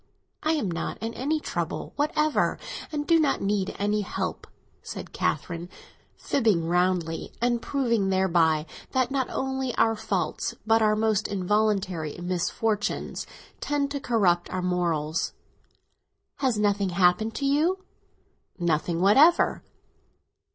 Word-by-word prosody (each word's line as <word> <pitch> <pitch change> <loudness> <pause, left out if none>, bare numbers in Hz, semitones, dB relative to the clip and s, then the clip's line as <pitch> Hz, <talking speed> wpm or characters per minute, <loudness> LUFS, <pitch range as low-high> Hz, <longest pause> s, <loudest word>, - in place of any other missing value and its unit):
"I 310 +1 +1
am 220 - -1
not 170 - -3
in 225 +1 -4
any 300 +6 -1
trouble - - -4
whatever, 300 +1 +1 0.3
and 295 -1 -2
do 330 0 +4
not 295 -3 +2
need 195 -1 -1
any 210 +1 +1
help," 200 - -4 0.3
said - - -8
Catherine, 170 0 -2 0.5
fibbing 215 -11 +1
roundly, 175 -1 0
and 240 0 +1
proving 235 -8 0
thereby 170 -5 +2 0.3
that 260 -1 +1
not 270 -2 0
only 265 -2 -2
our 225 0 +3
faults, 205 -6 -2
but 225 0 +4
our 215 -1 +4
most 215 -1 +1
involuntary 195 -5 0
misfortunes, 185 +4 -2 0.3
tend 285 -1 -1
to 280 - -2
corrupt 190 -9 +2
our 185 -1 -3
morals. 165 -3 0 1.0
"Has 255 -5 +1
nothing 205 -2 +1
happened 180 +5 +2
to 280 - -2
you?" 330 +7 +1 0.7
"Nothing 170 0 0
whatever." 275 - +5
210 Hz, 125 wpm, -26 LUFS, 180-265 Hz, 1.0 s, whatever